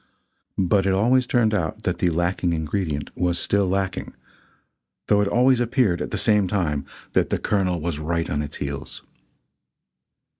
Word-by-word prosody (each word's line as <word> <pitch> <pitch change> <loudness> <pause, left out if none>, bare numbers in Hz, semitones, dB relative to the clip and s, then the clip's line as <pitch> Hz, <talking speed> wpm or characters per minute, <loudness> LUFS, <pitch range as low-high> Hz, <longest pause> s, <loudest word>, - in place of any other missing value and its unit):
But 95 +1 +2
it 95 - +2
always 125 +5 +3
turned 115 -3 +2
out 105 +3 -2
that 90 -1 -1
the 90 - +2
lacking 85 +1 0
ingredient 80 -1 -3
was 90 -1 0
still 100 +1 +1
lacking 95 0 -2 0.9
though 105 -1 +3
it 105 - +1
always 125 +3 +3
appeared, 120 - +1
at - - -3
the - - -3
same 105 -3 +3
time, 80 -7 -1 0.3
that - - +2
the - - 0
Colonel 95 -4 0
was 80 -1 -3
right 85 +2 -1
on 75 - -1
its 75 -1 -6
heels. 70 -1 -6
95 Hz, 160 wpm, -23 LUFS, 85-105 Hz, 0.9 s, always